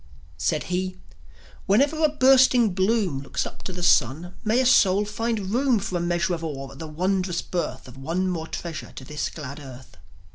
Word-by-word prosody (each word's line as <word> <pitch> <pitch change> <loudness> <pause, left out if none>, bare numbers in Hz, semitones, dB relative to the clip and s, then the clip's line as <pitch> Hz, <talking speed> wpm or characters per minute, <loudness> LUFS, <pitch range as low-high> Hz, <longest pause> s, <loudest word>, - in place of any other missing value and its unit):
Said 155 - 0
he: 185 0 -2 0.7
"Whenever 280 +10 +3
a 310 - +5
bursting 260 -6 +5
bloom 190 -5 +1
Looks 140 - -3
up - - -9
to - - -4
the 180 -1 -6
sun, 160 +5 +2
may 225 +3 +2
a 260 - +2
soul 200 -4 +5
find 210 -2 -2
room 255 +1 +2
For 195 -2 -3
a - - -2
measure 175 +1 0
of 165 -1 -4
awe 135 -4 -5
at 135 - -13
the 160 - -6
wondrous 185 +2 -1
birth 150 -8 -4
Of 125 +1 -13
one 170 +7 -1
more 165 -3 -3
treasure 165 -2 -6
to 130 - -9
this 150 +1 -3
glad 145 -2 -8
earth." 130 - -12
180 Hz, 190 wpm, -24 LUFS, 155-215 Hz, 0.7 s, a